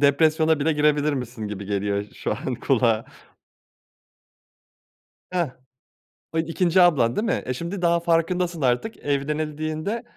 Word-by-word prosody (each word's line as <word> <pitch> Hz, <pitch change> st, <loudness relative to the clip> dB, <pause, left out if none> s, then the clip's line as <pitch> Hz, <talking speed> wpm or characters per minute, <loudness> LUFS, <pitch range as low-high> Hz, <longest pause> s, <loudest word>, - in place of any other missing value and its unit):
depresyona 155 Hz, +2 st, +3 dB
bile 160 Hz, +3 st, +2 dB
girebilirmişsin 145 Hz, -7 st, 0 dB
gibi 100 Hz, -1 st, -6 dB
geliyor 100 Hz, 0 st, -1 dB
şu -, -, -2 dB
an -, -, -3 dB
kulağa. 115 Hz, -3 st, +1 dB, 2.3 s
Heh. 175 Hz, -5 st, 0 dB, 0.8 s
O -, -, -1 dB
2'nci 170 Hz, +2 st, +2 dB
ablan, 130 Hz, -10 st, +4 dB
değil 215 Hz, -, 0 dB
mi? 230 Hz, -, 0 dB
E, 130 Hz, -, -2 dB
şimdi 170 Hz, +8 st, -5 dB
daha 170 Hz, 0 st, +3 dB
farkındasın 170 Hz, 0 st, 0 dB
artık 130 Hz, -, 0 dB
evlenildiğinde, 155 Hz, +7 st, -2 dB
155 Hz, 120 wpm, -24 LUFS, 130-170 Hz, 2.3 s, ablan